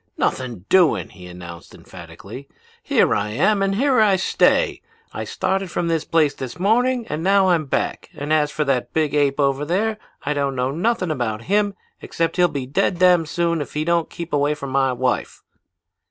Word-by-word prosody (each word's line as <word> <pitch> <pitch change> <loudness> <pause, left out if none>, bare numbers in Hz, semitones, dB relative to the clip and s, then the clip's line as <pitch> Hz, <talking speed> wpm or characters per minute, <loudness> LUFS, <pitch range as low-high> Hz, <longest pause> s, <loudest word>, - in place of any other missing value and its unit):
"'Nothing 120 -8 -2
doing!' 180 -4 +3
he 90 -3 -13
announced 85 -1 -11
emphatically. 140 +1 -11 0.3
'Here - - +2
I 105 +1 -1
am 195 - +1
and 195 0 +1
here 260 +2 +2
I 205 -3 +4
stay. 345 - +2 0.3
I - - -4
started 190 0 -2
from 170 -1 -2
this 165 -1 0
place 155 -3 +2
this 130 -3 -7
morning 240 +6 +1
and 150 +1 -4
now 195 +1 +3
I'm 165 -4 +2
back, 135 - -2
and 145 +2 -2
as 150 -1 +2
for 150 - -1
that 135 -4 -1
big 155 -3 +1
ape 145 -1 +1
over 140 0 +1
there 210 +7 -1 0.2
I 145 - -1
don't 140 -2 -1
know 125 +1 -1
nothing 185 +2 0
about 115 -5 -3
him 205 - +1 0.3
except 165 +1 -2
he'll 180 -1 +5
be 140 -5 -4
dead 145 +7 0
damn 180 -2 +4
soon 170 0 0
if 145 - -8
he 155 +1 -1
don't 170 -1 +1
keep 170 0 -8
away 145 +1 +1
from 140 -2 -7
my 135 -1 +2
wife.' 125 0 -2
155 Hz, 190 wpm, -21 LUFS, 135-185 Hz, 0.3 s, he'll